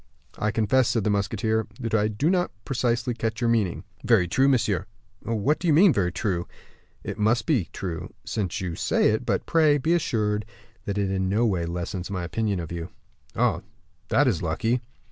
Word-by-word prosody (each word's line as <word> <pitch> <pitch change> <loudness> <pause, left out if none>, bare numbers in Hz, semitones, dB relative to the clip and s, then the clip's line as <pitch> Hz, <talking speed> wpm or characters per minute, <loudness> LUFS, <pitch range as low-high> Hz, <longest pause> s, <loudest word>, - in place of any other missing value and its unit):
"I 105 - +1
confess," 115 +4 +2
said 115 - +1
the 105 - +1
musketeer, 110 +2 0
"that 115 -3 -4
I 105 -1 +3
do 110 - 0
not 180 -2 +1 0.2
precisely 120 -1 0
catch 115 -1 -3
your 120 -2 +2
meaning." 105 -7 0 0.2
"Very 115 -7 +4
true, 130 +10 +3
monsieur." 110 -7 +1 0.3
"What 115 +7 0
do 175 - -2
you 160 - +5
mean 185 +3 +7
by - - -2
'very 90 -3 +2
true'?" 90 -3 -2 0.6
"It - - -5
must 110 +2 +2
be 120 - +1
true, 90 -1 -5
since 100 -3 -2
you 90 -2 -3
say - - +2
it; - - -2
but - - 0
pray, 155 -3 +4
be 160 +5 +1
assured 105 -10 0 0.4
that 100 0 -2
it 100 -1 0
in 95 -1 0
no 110 +5 +2
way 90 -6 0
lessens 90 +2 -4
my 95 -3 -3
opinion 100 +3 -1
of 85 -2 -6
you." 85 0 -5 0.5
"Ah, - - +1 0.5
that 145 0 +3
is 100 -10 +1
lucky." 115 +9 0
110 Hz, 195 wpm, -25 LUFS, 95-120 Hz, 0.6 s, mean